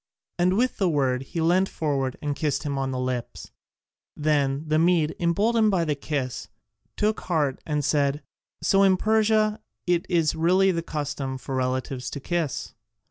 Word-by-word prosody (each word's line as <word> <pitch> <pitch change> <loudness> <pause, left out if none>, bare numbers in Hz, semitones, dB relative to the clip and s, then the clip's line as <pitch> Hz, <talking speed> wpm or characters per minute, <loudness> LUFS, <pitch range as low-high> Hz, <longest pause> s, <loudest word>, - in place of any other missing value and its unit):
And 180 +2 +3
with 250 +2 +1
the 190 -4 +2
word, 135 -5 +1
he 160 +5 -4
leant 180 +4 +3
forward 135 -4 -2
and 145 -1 -1
kissed 150 -1 -1
him 145 -2 -2
on 135 -1 -1
the 130 - -3
lips. 125 -2 -4 0.7
Then 145 -2 +1
the 155 0 +2
Mede, 165 -2 +2
emboldened 215 +6 +2
by 180 -4 +1
the 150 - +1
kiss, 140 -3 -4 0.5
took 215 +1 +1
heart 150 -7 -1
and 150 -2 -1
said, 145 0 +1 0.4
"So 195 - +4
in 190 -1 +5
Persia 215 0 +2 0.2
it 175 -1 +1
is 165 -4 +2
really 180 +4 +3
the 170 -2 -1
custom 145 -4 -4
for 130 +1 -7
relatives 130 0 -2
to 140 - -6
kiss?" 165 0 -3
155 Hz, 165 wpm, -25 LUFS, 140-180 Hz, 0.7 s, in